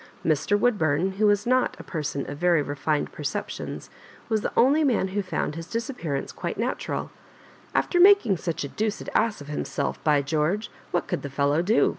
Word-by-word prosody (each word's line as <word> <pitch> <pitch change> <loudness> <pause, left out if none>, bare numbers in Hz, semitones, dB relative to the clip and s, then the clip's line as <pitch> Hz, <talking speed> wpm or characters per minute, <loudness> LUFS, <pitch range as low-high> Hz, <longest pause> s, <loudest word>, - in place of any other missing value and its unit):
Mr. 160 +6 +2
Woodbum, 190 -5 +1
who 215 +1 +4
was 205 0 +3
not 255 +1 +2
a - - -8
person 145 -4 -3
of 145 +1 -6
very 175 -4 +3
reined 145 +1 -1
perceptions, - - -5 0.4
was 220 -2 +1
the - - -2
only 285 +6 +5
man 235 -9 +2
who 205 +2 -1
found 185 -5 -2
his 165 +1 -7
disappearance 220 - -3
quite - - -5
na - - 0
tural - - -5 0.3
*' - - -25
Alter 355 - +2
making 360 - +6
such 165 -2 -3
a - - -3
deuced 210 +7 -3
ass 220 -9 +1
of 145 - -10
him* 150 - -3
self; 140 - -3
by 150 -2 +3
George 160 +9 0
I - - -27 0.2
what 175 - -1
could - - -2
the 140 - -5
fellow 140 +3 +1
do 210 +6 +3
180 Hz, 200 wpm, -25 LUFS, 150-220 Hz, 0.4 s, making